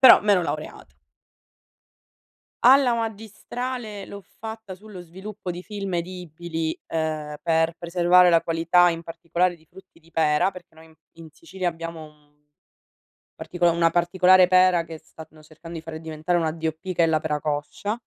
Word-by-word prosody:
però 260 Hz, -, +9 dB
m'ero 205 Hz, -4 st, +3 dB
laureata. 150 Hz, -, -6 dB, 1.7 s
Alla 255 Hz, -1 st, +6 dB
magistrale, 225 Hz, 0 st, -5 dB
l'ho 200 Hz, -1 st, -10 dB, 0.2 s
fatta 220 Hz, -3 st, -7 dB
sullo 195 Hz, -2 st, -11 dB
sviluppo 190 Hz, +3 st, -8 dB
di 175 Hz, +1 st, -6 dB
film 200 Hz, -3 st, -5 dB
edibili, 170 Hz, -2 st, -4 dB
ehm, 155 Hz, -2 st, -3 dB
per 165 Hz, 0 st, +1 dB
preservare 175 Hz, +1 st, +4 dB
la 165 Hz, -1 st, +5 dB
qualità 170 Hz, +2 st, +3 dB
in 165 Hz, 0 st, -3 dB
particolare 170 Hz, +2 st, -1 dB
di 160 Hz, -1 st, -22 dB
frutti 190 Hz, -1 st, -18 dB
di 165 Hz, +1 st, -24 dB
pera, 155 Hz, +3 st, +2 dB
perché 180 Hz, -3 st, -14 dB
noi, 160 Hz, 0 st, -16 dB
mhmm, 160 Hz, -, -21 dB, 0.2 s
in 165 Hz, -1 st, -11 dB
Sicilia 180 Hz, +3 st, -4 dB
abbiamo 165 Hz, -1 st, -6 dB
un 150 Hz, -1 st, -19 dB, 1.0 s
partico 175 Hz, -1 st, 0 dB
una 165 Hz, 0 st, +2 dB
particolare 180 Hz, +1 st, +5 dB
pera 185 Hz, -2 st, +5 dB
che 160 Hz, -1 st, -9 dB
stanno 155 Hz, -1 st, -15 dB
cercando 165 Hz, +2 st, -10 dB
di 160 Hz, -, -9 dB
fare 160 Hz, -1 st, -8 dB
diventare 160 Hz, +2 st, -2 dB
una 160 Hz, -1 st, 0 dB
D.O.P. 160 Hz, +3 st, -4 dB
che 170 Hz, -, +3 dB
è -, -, +4 dB
la 155 Hz, -1 st, +1 dB
pera 150 Hz, -2 st, -2 dB
coscia. 155 Hz, +9 st, -3 dB
170 Hz, 155 wpm, -24 LUFS, 160-185 Hz, 1.7 s, però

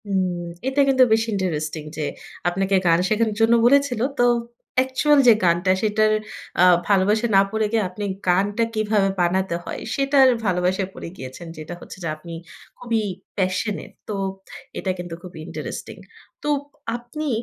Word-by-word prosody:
হু, 200 Hz, -, -7 dB, 0.6 s
এটা 270 Hz, +2 st, +2 dB
কিন্তু 260 Hz, -1 st, +5 dB
বেশি 225 Hz, +1 st, +2 dB
ইন্টারেস্টিং। 155 Hz, -5 st, -2 dB
যে, 155 Hz, -, -2 dB, 0.5 s
আপনাকে 195 Hz, +2 st, 0 dB
গান 165 Hz, 0 st, +5 dB
শেখানোর 215 Hz, 0 st, +1 dB
জন্য 225 Hz, +1 st, +5 dB
বলেছিল। 270 Hz, -2 st, +3 dB, 0.2 s
তো, 245 Hz, -, +5 dB, 0.5 s
অ্যাকচুয়াল 260 Hz, +3 st, +3 dB
যে 235 Hz, -, +10 dB
গানটা 175 Hz, +2 st, +3 dB
সেটার 215 Hz, 0 st, +2 dB, 0.5 s
আ -, -, +7 dB, 0.2 s
ভালোবাসে 210 Hz, +3 st, +3 dB
না 195 Hz, -, +8 dB
পড়ে 220 Hz, 0 st, 0 dB
গিয়ে 225 Hz, -2 st, +2 dB
আপনি 205 Hz, +3 st, -5 dB, 0.2 s
গানটা 200 Hz, +5 st, +2 dB
কীভাবে 210 Hz, -2 st, +1 dB
বানাতে 185 Hz, +1 st, +1 dB
হয় -, -, -6 dB, 0.2 s
সেটার 275 Hz, -1 st, +4 dB, 0.2 s
ভালোবাসায় 185 Hz, +1 st, 0 dB
পড়ে -, -, -8 dB
গিয়েছেন। 130 Hz, +6 st, -8 dB
যেটা 155 Hz, +2 st, -7 dB
হচ্ছে -, -, -10 dB
যে, -, -, -2 dB
আপনি 170 Hz, +2 st, -10 dB, 0.5 s
খুবই 230 Hz, -3 st, -1 dB, 0.3 s
passionate. 190 Hz, +2 st, -2 dB, 0.2 s
তো, 210 Hz, -, -2 dB, 0.6 s
এটা -, -, -3 dB
কিন্তু 175 Hz, -1 st, -6 dB
খুবই 180 Hz, -3 st, -10 dB
ইন্টারেস্টিং। -, -, -6 dB, 0.5 s
তো, 295 Hz, -, -1 dB, 0.5 s
আপনি 245 Hz, +6 st, -6 dB
205 Hz, 150 wpm, -22 LUFS, 180-230 Hz, 0.6 s, যে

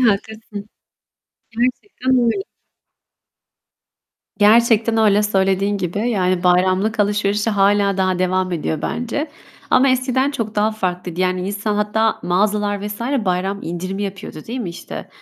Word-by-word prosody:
haklısın. 215 Hz, -2 st, -1 dB, 0.8 s
Gerçekten 255 Hz, -, -2 dB
öyle. 235 Hz, +12 st, +1 dB, 2.0 s
Gerçekten 225 Hz, +1 st, +4 dB
öyle 210 Hz, -1 st, +4 dB
söylediğin 195 Hz, 0 st, +1 dB
gibi. 200 Hz, +7 st, -2 dB
Yani 185 Hz, -4 st, +1 dB
bayramlık 185 Hz, +4 st, +2 dB
alışverişi 205 Hz, +1 st, +1 dB
hâlâ 200 Hz, -1 st, +2 dB
daha 185 Hz, -1 st, +1 dB
devam 185 Hz, 0 st, 0 dB
ediyor 160 Hz, -2 st, -2 dB
bence. 285 Hz, +6 st, -3 dB, 0.4 s
Ama 270 Hz, +1 st, +5 dB
eskiden 260 Hz, +1 st, +1 dB
çok 225 Hz, -6 st, -4 dB
daha 210 Hz, +1 st, +2 dB
farklıydı. 180 Hz, -4 st, -3 dB
Yani 185 Hz, 0 st, 0 dB
insan 205 Hz, +1 st, -2 dB
hatta 210 Hz, +1 st, +1 dB
mağazalar 205 Hz, +2 st, 0 dB
vs. 210 Hz, +1 st, -6 dB, 0.2 s
bayram 190 Hz, +2 st, -1 dB
indirimi 185 Hz, +4 st, -4 dB
yapıyordu, 195 Hz, -5 st, -6 dB
değil 245 Hz, +3 st, -4 dB
mi? 185 Hz, -, -4 dB
İşte, 170 Hz, -, -8 dB
205 Hz, 120 wpm, -19 LUFS, 185-220 Hz, 2.0 s, Ama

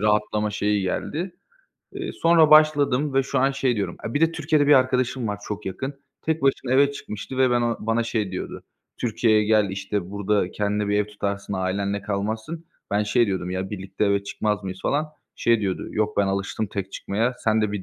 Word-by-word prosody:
rahatlama 105 Hz, 0 st, +1 dB
şeyi 105 Hz, -1 st, 0 dB
geldi. 165 Hz, -, -3 dB, 0.6 s
Eee, 380 Hz, -2 st, -5 dB
sonra 165 Hz, -2 st, +4 dB
başladım 150 Hz, -2 st, +5 dB
ve 135 Hz, -, +4 dB
şu 135 Hz, -, -1 dB
an 135 Hz, +1 st, +3 dB
şey 135 Hz, -3 st, 0 dB
diyorum 100 Hz, -, -2 dB
e, 115 Hz, -, -7 dB
bir 145 Hz, -, +1 dB
de 165 Hz, 0 st, +4 dB
Türkiye'de 155 Hz, -2 st, +1 dB
bir 145 Hz, -, +6 dB
arkadaşım 130 Hz, -2 st, +2 dB
var 105 Hz, -, -3 dB
çok 105 Hz, -1 st, -5 dB
yakın. 135 Hz, +9 st, -4 dB, 0.3 s
Tek 160 Hz, -2 st, -1 dB
başına 135 Hz, -2 st, +1 dB
eve 140 Hz, +1 st, +4 dB
çıkmıştı 130 Hz, 0 st, -7 dB
ve 130 Hz, -1 st, +4 dB
ben 120 Hz, 0 st, +3 dB
o 115 Hz, -1 st, 0 dB
bana 115 Hz, +2 st, +1 dB
şey 110 Hz, -4 st, -2 dB
diyordu: 90 Hz, -, -5 dB, 0.4 s
"Türkiye'ye 110 Hz, -2 st, +2 dB
gel." 105 Hz, -2 st, +3 dB
işte, 95 Hz, -1 st, -3 dB
"Burada 100 Hz, -2 st, 0 dB
kendine 105 Hz, 0 st, -1 dB
bir 105 Hz, -, +2 dB
ev 105 Hz, -, +1 dB
tutarsın, 100 Hz, -1 st, -4 dB
ailenle 100 Hz, +2 st, -1 dB
kalmazsın." 110 Hz, +11 st, -3 dB, 0.2 s
Ben 105 Hz, +1 st, +2 dB
şey 115 Hz, +3 st, +2 dB
diyordum: 95 Hz, -3 st, -2 dB
"Ya, 95 Hz, +1 st, -3 dB
birlikte 100 Hz, +1 st, -3 dB
eve 100 Hz, 0 st, +2 dB
çıkmaz 105 Hz, -1 st, -1 dB
mıyız" 95 Hz, 0 st, -5 dB
falan. 150 Hz, +2 st, +1 dB, 0.3 s
Şey 115 Hz, -2 st, +3 dB
diyordu: 95 Hz, -2 st, -2 dB
"Yok 105 Hz, 0 st, -1 dB
ben 100 Hz, -, +3 dB
alıştım 100 Hz, +2 st, -2 dB
tek 95 Hz, -1 st, -5 dB
çıkmaya, 115 Hz, +5 st, -1 dB
sen 110 Hz, 0 st, +3 dB
de 105 Hz, -1 st, 0 dB
bir 100 Hz, -, -3 dB
105 Hz, 200 wpm, -24 LUFS, 100-130 Hz, 0.6 s, bir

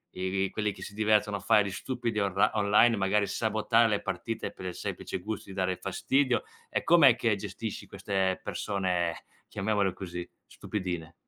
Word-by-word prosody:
e 95 Hz, +1 st, 0 dB
e -, -, -3 dB
quelli 105 Hz, -1 st, -1 dB
che -, -, -10 dB
si -, -, -8 dB
divertono 105 Hz, -1 st, +2 dB
a -, -, -8 dB
fare 105 Hz, +1 st, +4 dB
gli 100 Hz, -, -4 dB
stupidi 120 Hz, 0 st, -3 dB
orli 100 Hz, -2 st, +3 dB
online, 105 Hz, +2 st, +4 dB
magari 100 Hz, +2 st, +2 dB
sabotare 110 Hz, +2 st, +2 dB
le 105 Hz, -2 st, +1 dB
partite 115 Hz, -1 st, -3 dB
per 95 Hz, -, -10 dB
il 90 Hz, -, -4 dB
semplice -, -, -4 dB
gusto 100 Hz, +2 st, -6 dB
di 95 Hz, -, -8 dB
dare 95 Hz, -1 st, 0 dB
fastidio 125 Hz, +8 st, +1 dB, 0.3 s
e -, -, -1 dB
com'è 150 Hz, -8 st, +7 dB
che 115 Hz, -4 st, +1 dB
gestisci 100 Hz, +2 st, -6 dB
queste 95 Hz, -2 st, -1 dB
persone 90 Hz, -4 st, -1 dB, 0.2 s
chiamiamole 100 Hz, -1 st, 0 dB
così, 90 Hz, -1 st, -6 dB, 0.2 s
stupidine? 90 Hz, -5 st, -5 dB
100 Hz, 170 wpm, -29 LUFS, 95-110 Hz, 0.3 s, com'è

